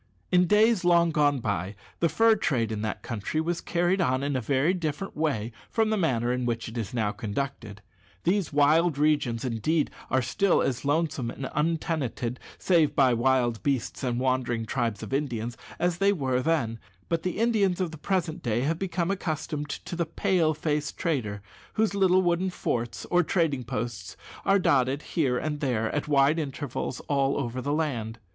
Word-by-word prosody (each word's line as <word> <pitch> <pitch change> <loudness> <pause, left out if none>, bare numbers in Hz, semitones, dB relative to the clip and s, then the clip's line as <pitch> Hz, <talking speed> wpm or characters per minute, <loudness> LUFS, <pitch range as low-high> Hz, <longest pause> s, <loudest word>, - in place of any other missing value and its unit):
In 180 -1 +4
days 215 0 +4
long 170 -1 +4
gone 145 -3 +2
by 100 -2 -2 0.2
the 170 - +3
fur 225 +8 +4
trade 115 - 0
in 105 -1 -3
that 110 -1 -3
country 115 +7 -3
was 170 +2 -1
carried 175 +2 +1
on 130 -5 +1
in 140 -1 -1
a 130 - 0
very 140 - +2
different 170 +1 -3
way 135 -8 -1 0.2
from 220 -1 +1
the - - +2
manner 125 - +1
in 125 -1 -1
which 115 -1 -2
it 110 - -8
is 115 -2 -3
now 110 -4 0
conducted. 105 0 -5 0.4
These 190 +1 +1
wild 150 +2 +3
regions, 145 -6 +1
indeed, 130 +7 0 0.2
are 130 -1 +2
still 175 +10 +2
as 130 -3 -1
lonesome 145 -4 0
and 135 +2 -6
untenanted 150 -6 -1 0.2
(save 165 -5 +2
by 130 -3 +4
wild 120 -1 +2
beasts 135 -1 -1
and 125 -2 0
wandering 125 -3 0
tribes 115 -3 -2
of - - -6
Indians) 120 -5 -2 0.2
as 175 0 0
they 200 0 +4
were 130 -8 0
then; 130 -8 0 0.3
but 165 -1 0
the 180 +2 -3
Indians 210 -5 +2
of 180 -3 -1
the 160 - -8
present 180 -2 -1
day 120 -4 0
have 160 +5 0
become 180 -1 -1
accustomed 155 -5 -3
to 175 - -5
the 170 -1 -1
"Pale 170 -3 +1
face" 150 0 -1
trader, 115 - -2 0.3
whose 220 -2 +1
little 190 -1 +4
wooden 175 +2 +1
forts 120 -9 -3
or 180 - +5
trading 160 -6 0
posts 115 -5 -5 0.3
are 195 - +5
dotted 140 -5 +2
here 135 -7 +2
and 150 +2 -2
there, 120 -6 0
at 145 - -2
wide 145 +2 +4
intervals, 140 -3 -4
all 140 -1 +1
over 130 -1 -3
the 145 - -2
land. 125 -8 -2
145 Hz, 180 wpm, -27 LUFS, 120-170 Hz, 0.4 s, or